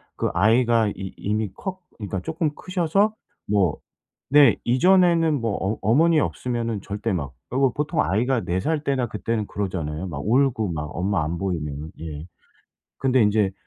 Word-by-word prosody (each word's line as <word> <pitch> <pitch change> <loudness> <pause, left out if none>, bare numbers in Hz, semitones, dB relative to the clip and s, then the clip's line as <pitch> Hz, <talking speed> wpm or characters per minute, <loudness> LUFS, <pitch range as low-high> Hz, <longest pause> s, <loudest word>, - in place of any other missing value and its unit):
그 - - -1
아이가 115 +3 +3
이 95 -2 -7
이미 105 -1 -2
커 185 -1 -5 0.2
그러니까 100 -3 -4
쪼끔 160 - -1
크셔서 185 +3 +1 0.3
뭐 100 -6 +2 0.6
네 145 -1 +7
이전에는 165 +1 +4
뭐 115 - 0
어 100 +3 -1
어머니 155 +10 +4
없으면은 115 -6 -2
절대 105 +3 -3
막 70 -7 -3 0.2
그리고 130 0 +2
보통 150 +3 0
아이가 120 +6 +1
4 90 +2 -1
살 155 +3 0
때나 135 -4 0
그때는 110 0 -2
그러잖아요 90 -5 -4
막 75 -6 -5
울고 115 -2 +2
막 75 -2 -3
엄마 95 0 0
안 85 +2 -3
보이면은. 80 -5 -4
예. 80 -1 -7 0.7
근데 130 -3 +3
인제 105 -2 +2
110 Hz, 305 characters per minute, -23 LUFS, 95-140 Hz, 0.7 s, 네